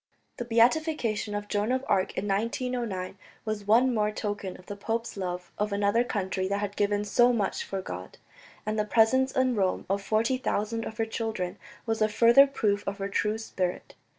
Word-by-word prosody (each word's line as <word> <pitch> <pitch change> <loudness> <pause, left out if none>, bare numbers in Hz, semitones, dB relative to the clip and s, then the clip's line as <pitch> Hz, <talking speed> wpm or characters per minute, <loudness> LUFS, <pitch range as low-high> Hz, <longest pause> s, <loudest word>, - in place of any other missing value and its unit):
The 240 - -4
beatification 235 -3 +2
of 205 0 -4
Joan 210 +3 0
of 260 +1 0
Arc 190 -1 +1
in - - -1
April 195 -1 +2
1909 230 -5 -3 0.3
was 215 -2 -3
one 245 +4 +5
more 210 -2 +1
token 205 -3 -4
of 185 - -17
the 205 - -6
pope's 225 +3 -3
love 180 -2 -4
of 210 0 0
another 205 +3 +2
country 190 -5 -2
that 200 +1 0
had 205 0 -3
given 205 0 +1
so 240 +4 +4
much 210 -5 -1
for 195 -1 -4
God, 90 - -7 0.5
and 215 0 -1
the - - +3
presence 235 +5 +3
in 260 -1 +2
Rome 190 -4 0
of 200 0 0
forty 225 +5 +1
thousand 225 -2 -1
of 220 - -8
her 225 - +1
children 220 -5 -3 0.3
was 225 -1 -1
a 215 - +4
further 235 +6 +6
proof 205 -7 0
of 200 0 -2
her 195 -1 -3
true 210 +2 0
spirit. 185 -5 -3
210 Hz, 195 wpm, -28 LUFS, 200-230 Hz, 0.5 s, further